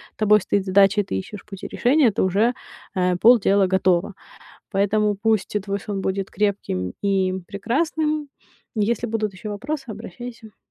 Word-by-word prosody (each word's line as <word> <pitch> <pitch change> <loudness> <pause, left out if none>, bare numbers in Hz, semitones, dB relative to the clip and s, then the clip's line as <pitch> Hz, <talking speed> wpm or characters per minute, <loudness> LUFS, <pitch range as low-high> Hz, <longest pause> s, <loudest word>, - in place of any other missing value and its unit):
тобой 210 -1 +4
стоит 200 +1 0
задача 200 +2 +4
и - - -4
ты 95 - -5
ищешь 200 - -7
пути 195 -2 -8
решения, 255 -1 +3
то - - 0
уже, 205 +6 +2 0.4
а, 180 -2 +1
полдела 200 -3 +5
готово. 185 +1 +1 0.6
Поэтому 205 +1 +1
пусть 215 0 0
и - - +1
твой 200 0 -3
сон 200 -2 -4
будет 190 0 -2
крепким 185 - -1
и 195 -2 +1
прекрасным. 300 - -1 0.5
Если 225 +2 0
будут 215 -2 -2
ещё 200 +3 -7
вопросы, 265 +7 -4
обращайся. 220 +1 -9
205 Hz, 150 wpm, -22 LUFS, 195-225 Hz, 0.6 s, полдела